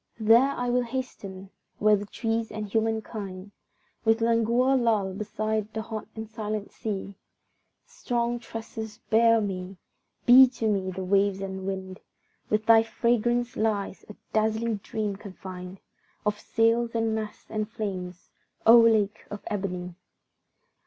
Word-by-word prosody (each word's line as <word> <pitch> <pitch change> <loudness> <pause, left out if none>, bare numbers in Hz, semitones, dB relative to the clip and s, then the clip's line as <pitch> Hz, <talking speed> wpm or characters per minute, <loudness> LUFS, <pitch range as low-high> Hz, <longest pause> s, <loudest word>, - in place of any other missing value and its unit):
There 230 +5 +6
I 245 -3 -2
will 250 0 +3
hasten, 210 -6 -6 0.3
where 210 0 +5
the 205 0 -5
trees 225 +1 -2
and 215 -1 -4
humankind 210 -3 -3 0.5
With 225 0 +3
languor 235 +3 +3
lull 220 -6 +1
beside 215 +1 -2
the 220 - -2
hot 220 -1 -6
and 220 0 -6
silent 215 -2 -4
sea; 200 -2 -4 0.7
Strong 240 - -2
tresses 225 -2 -7
bear 230 +1 +5
me, 190 -2 -4 0.5
be 260 +2 +9
to 235 -3 -3
me 195 -3 0
the 185 0 -5
waves 195 +1 +2
and 190 -1 -5
wind! 190 -1 -5 0.5
Within 215 0 +1
thy 225 0 +7
fragrance 240 +2 0
lies 210 -3 -1
a 210 - -9 0.2
dazzling 220 +1 +1
dream 205 0 -3
confined 185 -2 -9 0.5
Of 210 0 0
sails 230 +1 +1
and 225 -1 +1
masts 215 -1 -5
and 215 0 -2
flames 185 -5 -6 0.3
O 230 +1 +9
lake 215 -3 +3
of 205 - -7
ebony! 180 -3 -3
215 Hz, 135 wpm, -27 LUFS, 200-230 Hz, 0.7 s, be